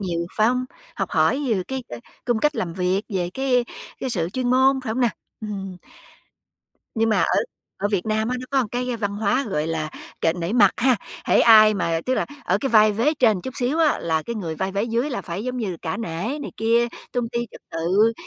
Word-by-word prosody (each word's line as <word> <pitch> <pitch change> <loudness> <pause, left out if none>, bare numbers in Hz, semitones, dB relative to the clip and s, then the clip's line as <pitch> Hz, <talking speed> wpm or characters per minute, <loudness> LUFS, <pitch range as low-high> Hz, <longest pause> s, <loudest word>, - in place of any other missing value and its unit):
nhiều, 170 -3 -2
phải 215 - +4
hông? 255 +1 0 0.3
Học - - -2
hỏi 275 - +2
về 210 -5 +1
cái, 265 -1 -3
ơ, 120 - -7 0.3
cung 240 -3 +1
cách 300 +6 +1
làm 170 -2 -2
việc, 185 +2 0
về 180 -4 -2
cái 255 -2 +2 0.4
cái 260 - -2
sự 170 -7 -1
chuyên 250 0 -1
môn, 265 +1 +4
phải 220 - -2
hông 245 - -2
nè? 245 - +4 0.3
Ừm. 195 -3 -5 1.2
Nhưng 225 0 +2
mà 215 -3 +3
ở - - +2 0.4
ở 205 - 0
Việt 200 -2 -1
Nam 220 +1 0
á 250 - -1
nó 255 - -8
có 275 - +2
một 245 -5 +1
cái 245 +1 -2
văn 205 -2 -3
hóa 215 +6 +1
gọi 155 -5 -1
là 160 -1 -2 0.3
kệ 165 - +3
nể 170 +2 -3
mặt 210 -5 +6
ha. 255 0 +3 0.3
Hễ - - +3
ai 215 -2 +7
mà 165 -4 0
tức 260 - +2
là - - 0 0.2
ở - - +2
cái 275 - -1
vai 215 -3 +5
vế 235 +9 +1
trên 245 -6 +4
một - - -5
chút 260 - -6
xíu 260 +6 0
á, 315 -3 +3
là 160 -1 0
cái 235 - -5
người 170 -6 -4
vai 190 +4 -3
vế 200 +1 0
dưới 235 +5 -1
là 245 - -2
phải 185 +5 -5
giống 255 0 -3
như 205 -8 -3
cả 165 +2 -2
nể 225 - -3
này - - -6
kia, 230 +2 +3 0.3
tôn 245 -2 -1
ti 235 - 0
trật - - -13
tự, 185 +8 +2
220 Hz, 240 wpm, -23 LUFS, 185-250 Hz, 1.2 s, ai